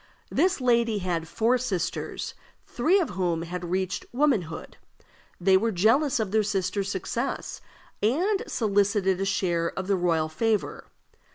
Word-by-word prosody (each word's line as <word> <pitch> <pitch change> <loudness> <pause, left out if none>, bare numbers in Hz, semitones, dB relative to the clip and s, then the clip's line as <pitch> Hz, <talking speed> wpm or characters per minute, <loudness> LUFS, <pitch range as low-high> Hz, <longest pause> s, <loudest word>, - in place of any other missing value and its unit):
This 370 -3 +2
lady 235 -3 +2
had 175 -4 -2
four 230 +8 +1
sisters, 200 -9 -3 0.3
three 330 +11 +2
of 345 - -1
whom 175 -3 -1
had 175 0 -5
reached 185 0 -1
womanhood. 240 - 0 0.6
They 190 +2 +4
were 225 +4 0
jealous 230 - +3
of 215 -4 -1
their 220 +1 +3
sister's 195 -1 -1
success, 215 +7 -3 0.4
and 355 - +2
solicited 200 -3 +1
a - - +1
share 175 -4 0
of 190 - -2
the 200 +1 +2
royal 170 -3 +1
favor. 215 +6 -1
200 Hz, 135 wpm, -26 LUFS, 180-235 Hz, 0.6 s, They